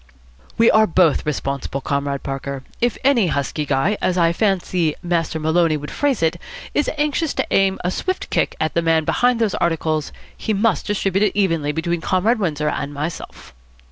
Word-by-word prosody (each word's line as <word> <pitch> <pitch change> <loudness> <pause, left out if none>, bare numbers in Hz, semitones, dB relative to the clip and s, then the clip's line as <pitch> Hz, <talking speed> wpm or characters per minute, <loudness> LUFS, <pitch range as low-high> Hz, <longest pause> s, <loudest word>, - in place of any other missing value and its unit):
"We 230 0 +5
are 215 0 +5
both 165 -4 +2
responsible, 140 -2 -2
Comrade 140 0 -2
Parker. 135 0 -5 0.2
If 240 0 +1
any 255 -8 +4
husky 145 0 -2
guy, 140 +10 +1
as 185 - 0
I 170 -1 +3
fancy 180 -5 0
Master 170 -2 -1
Maloney 160 0 +2
would 150 0 -7
phrase 275 -10 0
it, 165 +1 +1 0.4
is 295 - +1
anxious 300 +1 0
to - - 0
aim 195 -1 +3
a 180 - 0
swift 370 - -3
kick - - 0
at 155 - -1
the 170 - +1
man 165 -1 +2
behind 245 +5 +2
those 220 -4 +1
articles, 160 -3 -1 0.2
he 215 - -2
must 215 0 +1
distribute 195 -2 0
it 200 - -2
evenly 165 -7 +1
between 165 +2 -2
Comrade 205 +8 +1
Windsor 150 -6 -1
and 145 - -3
myself." 155 +4 -6
170 Hz, 175 wpm, -20 LUFS, 150-205 Hz, 0.4 s, We